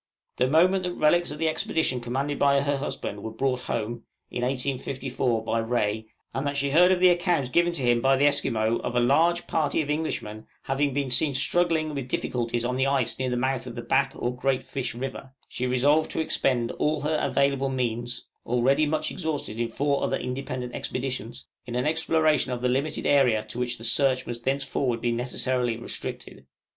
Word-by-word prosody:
The 125 - +3
moment 180 +7 +4
that 180 -1 -3
relics 175 +3 +3
of 150 - -6
the 165 +1 0
expedition 155 -4 0
commanded 135 +4 -2
by 140 0 +4
her 145 0 0
husband 105 -7 -5
were 110 - -5
brought 125 +3 -1
home 115 +2 -3 0.3
(in 120 - -3
1854) 130 -2 -1
by 115 0 0
Rae, 110 -2 -1 0.3
and 135 +2 -2
that 140 0 -2
she 140 0 0
heard 180 +5 +6
of 185 - +3
the 185 0 +7
account 175 -7 +1
given 175 +4 +3
to 140 - -3
him 120 -1 +3
by 135 +1 +4
the 140 - +3
Esquimaux 115 -5 +2
of - - -4
a - - +4
large 165 +8 +3
party 155 -2 0
of 150 -2 -1
Englishmen 110 -9 -3 0.2
having 140 +1 0
been 135 -1 -2
seen 140 +2 +3
struggling 160 +1 +1
with 135 -3 -4
difficulties 120 -2 -2
on 125 +1 -1
the 130 +1 +2
ice 125 -4 0
near 130 -1 0
the 125 - -1
mouth 130 0 -1
of - - -7
the - - -5
Back - - +1
or 125 +1 -2
Great 130 +1 0
Fish 125 -4 -4
River, 135 +1 -6
she 125 - -3
resolved 145 +5 +3
to - - -2
expend 130 -6 +1
all 150 -1 +1
her 155 +1 0
available 140 -1 +1
means 120 -2 -2 0.2
(already 135 +5 +2
much 155 +1 -1
exhausted 150 -9 -3
in 120 - +1
four 140 +4 0
other - - 0
independent 125 -1 -4
expeditions) 125 -2 -4 0.2
in 120 - -5
an 125 - 0
exploration 155 -2 +2
of 125 0 -4
the 125 - +2
limited 135 +5 -1
area 125 -7 +4
to 110 +3 -7
which 125 0 -2
the 115 - -12
search 130 +2 +2
must 120 -1 -6
thenceforward 135 -2 0
be 120 +1 0
necessarily 125 0 0
restricted. 120 - -7
130 Hz, 195 wpm, -26 LUFS, 120-145 Hz, 0.3 s, the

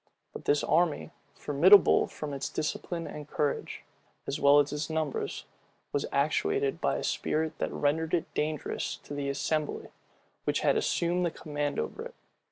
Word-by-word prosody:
But - - -9
this 145 0 +2
army, 165 -1 +1 0.2
formidable 175 +8 +6
from 150 -2 -6
its 135 - -3
discipline 165 +2 -3
and 150 -1 -8
courage, 145 -2 -2 0.4
as 140 - -3
well 140 +1 +6
as 145 0 +1
its 150 +1 -3
numbers, 160 -3 -2 0.5
was 145 - 0
actuated 410 - +1
by - - +1
a - - -4
spirit 155 0 -1
that - - -1
rendered 160 +3 +1
it 165 - -3
dangerous 155 0 -2
to - - -8
the 140 -1 -2
assembly 150 +2 -2 0.6
which - - +1
had - - +3
assumed 175 +1 +1
the 175 - +2
command 145 -2 -3
over 75 - -3
it. - - -9
150 Hz, 160 wpm, -29 LUFS, 145-165 Hz, 0.6 s, formidable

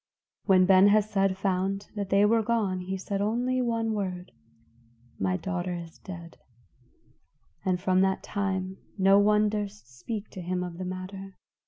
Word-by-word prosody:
When 185 -2 +5
Ben 190 +1 +7
Hesed 200 -2 +2
found 195 +1 -1
that 200 -2 -3
they 200 +1 +4
were 225 +2 +4
gone, 215 -5 0
he 190 +1 -4
said 195 +1 -3
only 245 +5 0
one 230 -2 0
word: 185 -3 -4 0.9
"My 95 -1 +1
daughter 180 - -3
is 170 -1 -9
dead." 170 -3 -10 1.2
And 185 -1 0
from 185 0 +2
that 190 0 +1
time 190 -2 -2 0.2
no 195 +1 +5
one 210 +1 +4
durst 205 - -5
speak 215 - -5
to 185 - -7
him 180 +1 -2
of 175 -1 -7
the 185 - -3
matter. 185 +1 -7
195 Hz, 155 wpm, -28 LUFS, 185-205 Hz, 1.2 s, Ben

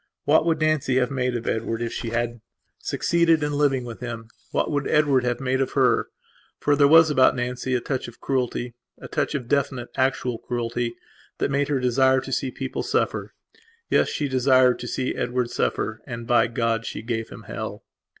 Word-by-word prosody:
What 155 +3 +4
would 165 -2 +2
Nancy 155 -4 +1
have 130 0 +2
made 125 -2 -1
of 115 -1 -4
Edward 115 0 -1
if 115 0 -3
she 115 - -4
had 120 0 -2 0.4
succeeded 165 -2 +2
in 150 - 0
living 140 -3 +1
with 115 -2 -8
him; 115 -2 -6 0.2
what - - 0
would 145 -2 -1
Edward 145 -4 +3
have 120 -1 0
made 130 0 0
of 135 - -1
her? - - +3 0.5
For 145 - +2
there 140 -1 +5
was 160 +1 +7
about 130 -3 +4
Nancy 125 +1 -2
a 125 - 0
touch 130 0 -3
of 120 - -12
crueltya 125 -2 -2 0.4
touch - - -1
of 125 -4 -4
definite 135 -3 -1
actual 130 -2 0
cruelty 120 0 -3 0.4
that - - -1
made 140 0 +1
her 145 -2 0
desire 130 +1 +3
to 135 0 -7
see 130 0 -1
people 130 0 -4
suffer. - - -1 0.6
Yes, - - +3
she 145 - -2
desired 130 -1 +4
to 120 - -6
see 130 +2 -2
Edward 125 0 -2
suffer. 110 0 -1
And, 120 -2 -6
by 120 0 +3
God, 115 -1 -1
she - - -5
gave 115 -1 -3
him - - -11
hell. - - -6
130 Hz, 190 wpm, -24 LUFS, 120-140 Hz, 0.6 s, was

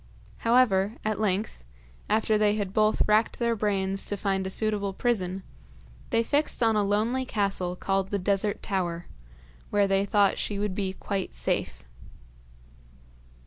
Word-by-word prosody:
However, 230 -4 +3
at 215 -1 -1
length, 200 - -1 0.5
after 220 0 +2
they 210 -1 +3
had 200 -3 -3
both 215 0 +3
racked 215 +2 +2
their 235 -1 +1
brains 195 -2 -1
to 205 - -2
find 195 -1 -1
a - - -3
suitable 205 -1 -1
prison, 190 -4 -1 0.7
they 230 - +2
fixed 285 0 +1
on 225 -1 +3
a 210 - +3
lonely 220 +6 0
castle 195 -6 -2
called 195 +1 -1
the 200 - -1
Desert 200 +2 -1
Tower, 175 -4 -2 0.6
where 205 -1 +2
they 195 0 +2
thought 200 -1 +2
she 205 - -2
would 205 -1 -1
be 190 -1 -2
quite 195 0 -4
safe. - - -2
205 Hz, 145 wpm, -27 LUFS, 195-215 Hz, 0.7 s, However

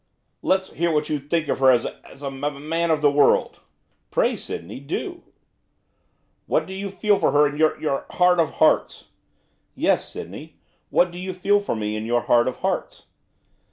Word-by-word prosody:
'Let's 190 0 0
hear 170 0 0
what 150 -1 0
you 150 -1 -1
think 155 +3 -1
of - - -1
her 135 -1 +6
as 120 -2 +4
a - - -7
as 140 - -14
a - - -4
m 140 +2 -4
man 165 +1 0
of 155 -2 +2
the 145 - +5
world!' 145 -1 +3 0.5
'Pray, - - +1
Sydney, 85 +9 -7
do!' 345 - -5 1.3
'What - - +1
you 195 +1 -5
feel 205 +1 +1
for - - +3
her 145 +1 +5
in 145 0 -2
your 155 0 +2
your 150 -3 -2
heart 180 -1 +3
of 160 -3 +1
hearts!' - - +2 0.7
'Yes, - - +1
Sydney, - - -9 0.3
what 175 0 +3
do 175 - -9
you 185 0 -4
feel 205 +3 +2
for 200 - -3
me 105 -1 -3
in 110 +1 -4
your 120 +1 +2
heart 120 +1 +3
of 130 - -2
hearts? - - -3
150 Hz, 190 wpm, -23 LUFS, 135-180 Hz, 1.3 s, her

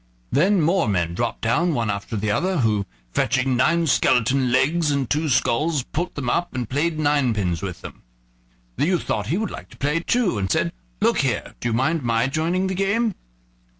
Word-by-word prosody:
Then 185 +5 +3
more 175 -1 +2
men 85 -4 0
dropped 120 +6 -2
down, 160 +9 +1
one 115 -4 0
after 100 +3 -5
the 105 0 -1
other, 185 - 0
who 105 -4 +1 0.2
fetching 130 - +1
nine 165 +7 +2
skeleton 130 -2 +2
legs 150 +5 +2
and 140 -3 0
two 155 +4 0
skulls, 140 +4 +1
put 175 +7 -4
them 140 -4 -4
up 170 +5 -1
and 125 -3 -2
played 155 +6 -1
ninepins 120 - +1
with 95 -3 -5
them. - - -10 0.8
The - - +1
youth 180 -2 +1
thought 105 -1 -2
he 160 +9 0
would 220 +1 -2
like - - -9
to - - -16
play 145 +4 0
too, 190 - 0
and 95 -1 -2
said: 90 -1 0 0.3
"Look - - +3
here; - - -1
do 120 - -2
you - - -1
mind 155 +7 +1
my 115 -1 +1
joining 165 +7 0
the 190 - -1
game?" 200 +4 +1
140 Hz, 195 wpm, -22 LUFS, 115-170 Hz, 0.8 s, Then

